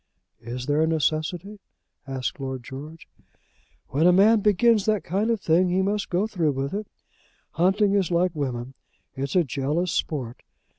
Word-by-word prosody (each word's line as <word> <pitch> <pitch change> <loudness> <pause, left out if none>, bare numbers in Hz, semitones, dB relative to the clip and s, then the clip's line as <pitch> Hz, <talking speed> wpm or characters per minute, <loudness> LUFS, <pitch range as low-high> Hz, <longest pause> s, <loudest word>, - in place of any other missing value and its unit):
"Is 125 +2 -6
there 145 +2 +1
a 160 - +3
necessity?" 160 +6 -1 0.5
asked 130 0 -4
Lord 130 -2 -5
George. 150 +6 -9 0.8
"When 155 +6 +2
a - - +7
man 210 +5 +5
begins 210 +1 +3
that 215 -3 +1
kind 200 +6 -1
of 230 -2 +1
thing 180 0 +2
he 185 +2 +1
must 205 +1 -1
go 180 +4 +1
through 170 -9 0
with 135 +3 -3
it. 210 +1 -3 0.6
Hunting 195 +4 +2
is 195 -3 +1
like 175 +1 +2
women. 130 -4 -4 0.4
It's 135 +3 -4
a 180 - +5
jealous 150 +5 -1
sport. 125 -6 -3
170 Hz, 160 wpm, -25 LUFS, 140-195 Hz, 0.8 s, a